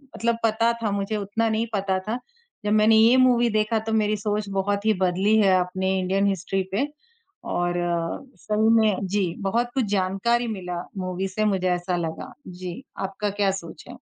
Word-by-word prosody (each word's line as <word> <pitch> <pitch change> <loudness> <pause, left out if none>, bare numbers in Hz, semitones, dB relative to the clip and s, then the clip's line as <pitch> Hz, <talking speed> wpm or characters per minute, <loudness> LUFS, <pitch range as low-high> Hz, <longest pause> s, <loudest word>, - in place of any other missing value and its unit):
मतलब 235 0 0
पता 225 +1 +3
था 215 - 0
मुझे 200 +2 -1
उतना 220 +3 -1
नहीं 220 +1 0
पता 195 -2 0
था। 230 +3 -2 0.5
जब 210 - +1
मैंने 215 +1 +5
ये 230 +4 +6
मूवी 245 -2 +4
देखा 215 +1 +1
तो 225 - -2
मेरी 215 -1 +2
सोच 205 0 -2
बहुत 200 +1 -1
ही 220 - +5
बदली 190 +4 +3
है 195 -3 +4
अपनी 190 +1 -1
इंडियन 190 +2 +1
हिस्ट्री 195 0 -1
पे, 275 +9 +1 0.6
और 175 0 -1 0.6
सही 215 +1 +1
में 210 -3 +2
जी 190 -3 0
बहुत 235 +5 0
कुछ 260 -3 +2
जानकारी 205 +5 +1
मिला 180 -5 -4 0.2
मूवी 185 +1 -2
से 215 +3 -1
मुझे 190 -3 +1
ऐसा 175 +1 -1
लगा। 165 -2 -5
जी 180 +5 -7 0.2
आपका 200 +2 -3
क्या 200 -1 +1
सोच 180 -4 -8
है? - - -8
200 Hz, 180 wpm, -24 LUFS, 190-220 Hz, 0.6 s, ये